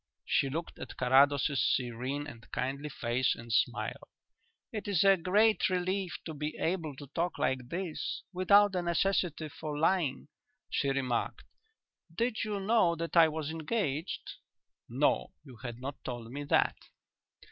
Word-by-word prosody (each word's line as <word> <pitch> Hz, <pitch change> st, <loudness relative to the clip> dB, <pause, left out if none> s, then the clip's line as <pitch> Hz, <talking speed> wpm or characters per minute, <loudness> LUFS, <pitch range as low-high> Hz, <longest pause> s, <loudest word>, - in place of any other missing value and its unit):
She 135 Hz, -, +2 dB
looked 165 Hz, +5 st, -5 dB
at -, -, -8 dB
Carrados's 135 Hz, +2 st, +4 dB
serene 130 Hz, +4 st, -1 dB
and 115 Hz, -6 st, -11 dB
kindly 140 Hz, +3 st, -2 dB
face 125 Hz, -1 st, 0 dB
and 115 Hz, -1 st, -7 dB
smiled. -, -, 0 dB, 0.6 s
"It 215 Hz, -1 st, -5 dB
is 200 Hz, -4 st, +3 dB
a 195 Hz, 0 st, +7 dB
great 205 Hz, +6 st, +3 dB
relief 185 Hz, 0 st, -1 dB
to 160 Hz, -, -5 dB
be 150 Hz, +1 st, -4 dB
able 165 Hz, -4 st, -1 dB
to 145 Hz, -, -9 dB
talk 170 Hz, +1 st, -1 dB
like 130 Hz, -2 st, -1 dB
this, 175 Hz, -1 st, -4 dB
without 200 Hz, +3 st, +5 dB
the 185 Hz, -2 st, -1 dB
necessity 170 Hz, -2 st, 0 dB
for 150 Hz, +1 st, -5 dB
lying," 160 Hz, -4 st, +1 dB, 0.4 s
she 140 Hz, -, +1 dB
remarked. 130 Hz, -3 st, -1 dB, 0.7 s
"Did 230 Hz, +6 st, -1 dB
you 210 Hz, -2 st, -2 dB
know 195 Hz, -4 st, +3 dB
that 165 Hz, +1 st, -4 dB
I 165 Hz, -1 st, +8 dB
was 155 Hz, -1 st, -3 dB
engaged?" 160 Hz, -1 st, -3 dB, 0.5 s
"No; 135 Hz, +5 st, +1 dB
you 130 Hz, -5 st, -13 dB
had 120 Hz, +1 st, -7 dB
not 135 Hz, +2 st, -7 dB
told 120 Hz, -2 st, -6 dB
me 145 Hz, +2 st, -5 dB
that." -, -, +2 dB
155 Hz, 145 wpm, -31 LUFS, 135-185 Hz, 0.7 s, I